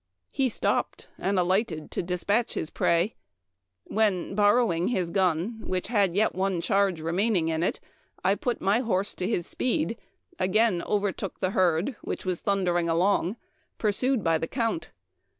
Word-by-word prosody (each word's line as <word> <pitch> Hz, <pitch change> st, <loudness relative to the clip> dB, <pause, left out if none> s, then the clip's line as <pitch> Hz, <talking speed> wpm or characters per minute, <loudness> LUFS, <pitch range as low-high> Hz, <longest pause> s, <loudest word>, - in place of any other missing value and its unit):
He 270 Hz, -2 st, +1 dB
stopped", -, -, -1 dB
and 195 Hz, +1 st, 0 dB
alighted 180 Hz, -3 st, 0 dB
to -, -, -1 dB
dispatch 185 Hz, +6 st, 0 dB
his 155 Hz, -, -3 dB
prey, 170 Hz, +6 st, +1 dB, 0.7 s
when, 205 Hz, -4 st, 0 dB
borrowing 205 Hz, -4 st, +3 dB
his 185 Hz, -8 st, 0 dB
gun, 190 Hz, +4 st, 0 dB
which 185 Hz, +2 st, -3 dB
had 200 Hz, -6 st, +2 dB
yet 215 Hz, +2 st, +3 dB
a 190 Hz, -1 st, 0 dB
charge 195 Hz, -1 st, +1 dB
remaining 175 Hz, +2 st, +1 dB
in 160 Hz, 0 st, -1 dB
it, 175 Hz, -, 0 dB, 0.4 s
I 190 Hz, -, +4 dB
put 240 Hz, +3 st, -2 dB
my 200 Hz, +4 st, +3 dB
horse 205 Hz, -5 st, 0 dB
to 180 Hz, -, -3 dB
his 180 Hz, -6 st, 0 dB
speed, 230 Hz, -4 st, -1 dB, 0.4 s
again 190 Hz, 0 st, +2 dB
overtook 200 Hz, -2 st, -2 dB
the 185 Hz, -1 st, 0 dB
herd 185 Hz, -, +1 dB
which -, -, -5 dB
was 185 Hz, -2 st, -1 dB
thundering 175 Hz, -4 st, +1 dB
along, 180 Hz, +3 st, +2 dB, 0.4 s
pursued 230 Hz, +2 st, +1 dB
by 165 Hz, -1 st, +2 dB
the 165 Hz, -, -2 dB
Count. 230 Hz, -7 st, -2 dB
190 Hz, 150 wpm, -27 LUFS, 175-215 Hz, 0.7 s, I